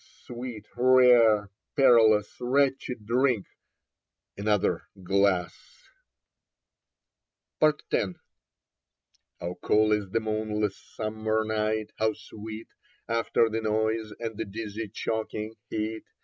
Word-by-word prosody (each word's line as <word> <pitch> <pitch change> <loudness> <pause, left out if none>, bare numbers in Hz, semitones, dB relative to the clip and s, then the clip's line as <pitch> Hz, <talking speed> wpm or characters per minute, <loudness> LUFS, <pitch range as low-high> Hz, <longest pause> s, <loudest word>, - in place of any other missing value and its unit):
O - - -14
sweet, 120 -3 -7
rare, 120 -5 +5 0.2
perilous, 110 -7 +5
retchy 135 0 +1
drink! 120 0 +1 0.9
Another 105 0 0 0.2
glass... 95 -2 +2 2.1
yS 155 -1 +5 0.2
Leda - - +2
X - - -33 1.2
HOW 90 +1 -5
cool 110 0 +3
is 105 -2 0
the 115 - +1
moonless 110 -1 -1
summer 110 0 -2
night, 110 0 -1
how 110 0 +2
sweet 110 0 -9 0.4
After 115 0 +2
the 110 0 -2
noise 110 0 0
and 115 -2 -5
the 110 - -1
dizzy 110 +1 -5
choking 110 +1 -4 0.2
heat! 110 +1 -3
110 Hz, 105 wpm, -27 LUFS, 105-115 Hz, 2.1 s, rare